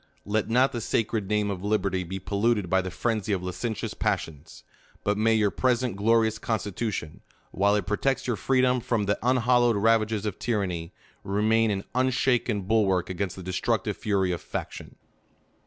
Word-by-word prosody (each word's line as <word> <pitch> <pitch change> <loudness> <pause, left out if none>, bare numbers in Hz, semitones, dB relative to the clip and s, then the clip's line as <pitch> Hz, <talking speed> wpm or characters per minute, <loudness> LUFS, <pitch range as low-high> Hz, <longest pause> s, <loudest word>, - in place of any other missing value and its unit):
Let 105 +2 -1
not 125 +4 +3
the 120 - -4
sacred 110 -2 -1
name 105 -1 +1
of 95 -1 -5
LIBER 105 -1 +1
TY 95 0 -1
be 95 +3 -5
polluted 100 0 0
by 95 - +4
the 95 - -5
frenzy 110 +2 -1
of 90 -2 -2
licentious 90 +5 -3
pi - - +1
'prions; 80 0 -11 0.4
but 105 - +1
may 110 +2 +3
your 105 -2 +2
present 125 -2 0
glorious 110 +1 +2
constitution, 105 -6 -3 0.3
while 100 +2 +2
it 100 -3 -1
protects 115 +7 0
your 120 - 0
freedom 130 +3 +2
from 115 -3 -1
the 100 0 0
unhallowed 120 -1 +3
ravages 110 0 +2
of 105 -2 -3
tyranny, 90 -8 -2 0.3
remain 110 +3 +2
an 100 -1 -1
unshakea 125 -4 +1
bulwark 95 -4 +2
against 95 0 -3
the 95 - -9
de 95 - -4
structive 105 +1 -1
fury 100 -4 0
of 85 - -3
faction. - - -6
105 Hz, 170 wpm, -26 LUFS, 95-115 Hz, 0.4 s, by